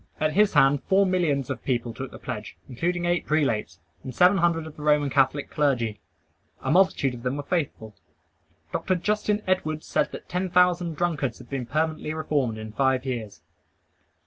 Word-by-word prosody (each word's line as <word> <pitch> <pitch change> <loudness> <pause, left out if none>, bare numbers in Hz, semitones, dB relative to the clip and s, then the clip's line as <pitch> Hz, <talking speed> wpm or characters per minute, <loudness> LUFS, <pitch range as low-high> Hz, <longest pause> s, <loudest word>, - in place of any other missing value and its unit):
At 155 0 +1
his 210 +3 +3
hand 135 +1 +5
four 195 +1 +4
millions 165 -8 0
of - - -5
people 120 -3 -1
took 130 +3 -6
the - - -11
pledge, - - -7
including 175 +7 -2
eight 175 0 +1
prelates, 115 - 0 0.3
and 130 -2 -7
seven 180 +2 +5
hundred 165 -1 +1
of 160 - -10
the - - -11
Roman 150 -2 +2
Catholic 135 +1 +1
clergy. 120 -8 0 0.6
A 130 - 0
multitude 170 -7 +3
of 120 - -8
them 125 +3 -2
were 145 - -4
faithful. 140 - -3 0.8
Dr. 185 - 0
Justin 210 +3 0
Edwards 155 -5 -1
said - - 0
that - - -9
ten 180 +1 -2
thousand 175 -2 +3
drunkards 155 -5 -1
had - - -15
been 130 -3 -3
permanently 155 +2 -1
reformed 140 -7 -1
in 110 0 -7
five 130 +2 +1
years. 110 -10 -5
150 Hz, 175 wpm, -25 LUFS, 130-175 Hz, 0.8 s, hand